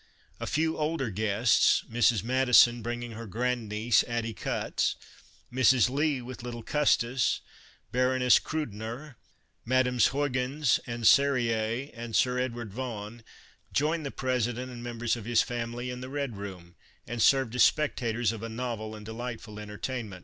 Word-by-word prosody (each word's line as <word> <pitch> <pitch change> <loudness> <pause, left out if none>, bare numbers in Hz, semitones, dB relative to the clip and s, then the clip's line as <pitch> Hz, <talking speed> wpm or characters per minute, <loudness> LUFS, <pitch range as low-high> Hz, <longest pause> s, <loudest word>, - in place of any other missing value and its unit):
A - - -4
few 160 +2 0
older 150 -6 -1
guests, 110 +3 +3
Mrs. 115 -2 +2
Madison 125 -1 +5
bringing 120 +1 -4
her 115 0 -8
grand 120 +1 -2
niece, 110 +2 +3
Addie 115 -1 -2
Cutts; - - -1 0.6
Mrs. 125 -1 +4
Lee 140 -2 0
with 125 0 -8
little 120 -1 -6
Custis, 130 -4 +1 0.5
Baroness 125 -1 +4
Krudener, 120 -1 -5 0.5
Mesdames 125 0 +3
Huygens 135 0 0
and 120 -1 -5
Serrurier 125 -2 +3
and 115 -2 -6
Sir 125 0 +2
Edward 120 -5 -4
Vaughn, 115 -2 -6 0.5
joined 155 +3 0
the 140 - -3
Presi 125 -3 -1
dent 125 +1 -6
and 120 -1 -8
members 120 -1 -2
of 115 -3 -8
his 120 0 +3
family 120 +1 -4
in 125 0 -7
the 130 - -7
Red 140 -4 -3
Room 90 -4 -9 0.3
and 120 0 -4
served 130 0 +4
as 125 - +1
spectators 120 -7 +2
of 115 -2 -7
a 115 - -5
novel 110 -2 -4
and 105 -1 -10
delightful 115 -1 -6
entertainment. 105 -1 -5
120 Hz, 150 wpm, -28 LUFS, 115-130 Hz, 0.6 s, Madison